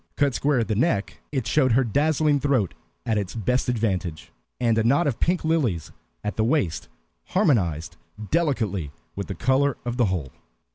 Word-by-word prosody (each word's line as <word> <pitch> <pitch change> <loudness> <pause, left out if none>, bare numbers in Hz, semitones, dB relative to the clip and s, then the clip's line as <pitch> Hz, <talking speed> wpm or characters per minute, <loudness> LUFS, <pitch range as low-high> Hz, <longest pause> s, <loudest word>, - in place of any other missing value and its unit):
Cut 140 -2 +2
square 140 +2 +1
at 115 - +1
the 110 - 0
neck, 105 -2 0
it 130 -5 -1
showed 130 -6 +3
her 135 +3 +4
dazzling 150 +4 +2
throat 135 - +1 0.3
at 110 -2 +1
its 100 +1 -5
best 125 +4 0
advantage, 95 -9 -2 0.3
and 115 -2 +2
a - - +2
knot 140 +9 +3
of 140 -6 -1
pink 175 -1 +1
lilies 130 - 0 0.3
at 105 - -3
the 110 - +2
waist 110 - 0 0.4
harmonized 85 - +1 0.3
delicately 110 - 0 0.2
with 100 - -4
the 95 - -4
color 130 +6 +2
of 120 0 -3
the 120 - +4
whole. 90 -9 -2
120 Hz, 175 wpm, -24 LUFS, 100-145 Hz, 0.4 s, her